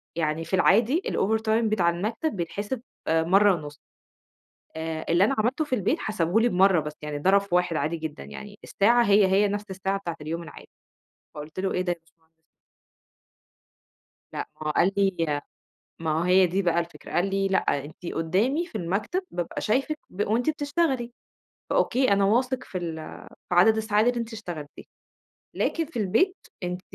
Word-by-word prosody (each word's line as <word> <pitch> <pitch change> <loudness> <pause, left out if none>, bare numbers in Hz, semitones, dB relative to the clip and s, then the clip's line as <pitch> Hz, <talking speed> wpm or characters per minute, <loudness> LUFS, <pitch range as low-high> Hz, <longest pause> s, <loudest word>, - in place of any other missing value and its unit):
يعني 160 0 -1
في 180 - 0
العادي 230 - +4
الover 220 +3 +1
time 220 +1 +1
بتاع 185 -5 +2
المكتب 215 - -2
بيتحسب 205 +7 -4 0.3
مَرّة 185 +5 +4
ونُص. 150 -2 -9 0.9
آآ، 160 0 -4
اللي 175 +3 +4
أنا 230 +7 +2
عملته 265 +8 +1
في 260 - 0
البيت 245 - 0
حسبُه 195 -1 0
لي 240 - +3
بمَرّة 190 -3 +4
بس، 150 0 -5
يعني 150 -1 -4
ضرب 190 +6 +4
في 200 -3 -2
1 180 -2 +1
عادي 155 +3 -1
جدًا، 160 - -6
يعني 205 - -10
الساعة 235 +4 +3
هي 200 -1 +5
هي 195 +2 +3
نَفس 205 +1 -3
الساعة 195 +1 -2
بتاعة 170 -4 -5
اليوم 165 +3 -4
العادي، 165 - -12 0.7
فقُلت 150 +4 -7
له: 195 - -1
"إيه 180 - 0
ده 180 -1 0
يا - - -4
بشمهندس؟!". 160 -1 -34 1.9
لأ - - -4
ماهو 155 0 -1
قال 175 +5 +3
لي 165 -7 +1 0.6
ما 160 +1 -1
هي 185 0 +6
دي 185 +3 0
بقى 170 -2 +1
الفكرة، 170 0 -8
قال 185 +3 +1
لي: 195 0 +1
"لأ 190 - +3 0.3
أنتِ 160 +4 -11
قُدّامي 210 - +1
في 225 - -6
المكتب 195 - -1
بابقى 175 -1 -4
شايفِك 275 +7 0
ب 200 - -2
وأنتِ 235 +8 +1
بتشتغلي، 285 -5 -1 0.6
فأوكي 255 -1 +2
أنا 200 0 +3
واثق 250 +5 +1
في 185 - -6
ال 170 -3 -4 0.5
في 180 - 0
عدد 220 +5 +6
الساعات 215 0 +2
اللي 245 -1 +1
أنتِ 230 0 -5
اشتغلتيها، 175 -9 -8 0.7
لكن 330 -1 0
في 300 -5 -7
البيت 225 - +2 0.3
أنتِ 180 0 -3
195 Hz, 170 wpm, -26 LUFS, 170-220 Hz, 1.9 s, هي